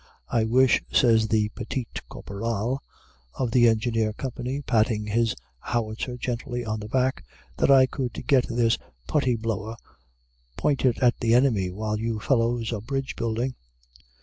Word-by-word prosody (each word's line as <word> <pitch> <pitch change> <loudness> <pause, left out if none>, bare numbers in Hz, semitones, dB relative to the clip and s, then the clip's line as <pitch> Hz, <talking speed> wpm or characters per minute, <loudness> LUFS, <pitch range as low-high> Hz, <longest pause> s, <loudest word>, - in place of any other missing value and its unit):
"I 115 -2 +2
wish," 125 +3 +4
says 115 -3 +4
the 105 -1 +1
petit 120 +3 -4 0.2
caporal 115 +5 -3 0.6
of 125 -3 -1
the 120 0 +5
Engineer 110 -1 +1
Company, 130 +3 -4
patting 110 -3 +1
his 115 +2 +1 0.2
howitzer 115 - -3
gently 120 0 -3
on 110 0 -2
the 105 - -7
back, 130 +3 0 0.3
"that - - +2
I 135 -1 +7
could 130 -2 -4
get 135 -4 +3
this 115 -1 +1 0.3
Putty 130 -5 +2
Blower 110 0 -3 0.8
pointed 130 -4 +2
at 120 -1 +4
the 115 0 +3
enemy, 115 -8 +3
while 105 +3 -3
you 115 -1 -2
fellows 115 -1 +1
are 105 - -3
bridge 135 +3 -3
building." 115 +3 -1
115 Hz, 145 wpm, -25 LUFS, 110-125 Hz, 0.8 s, I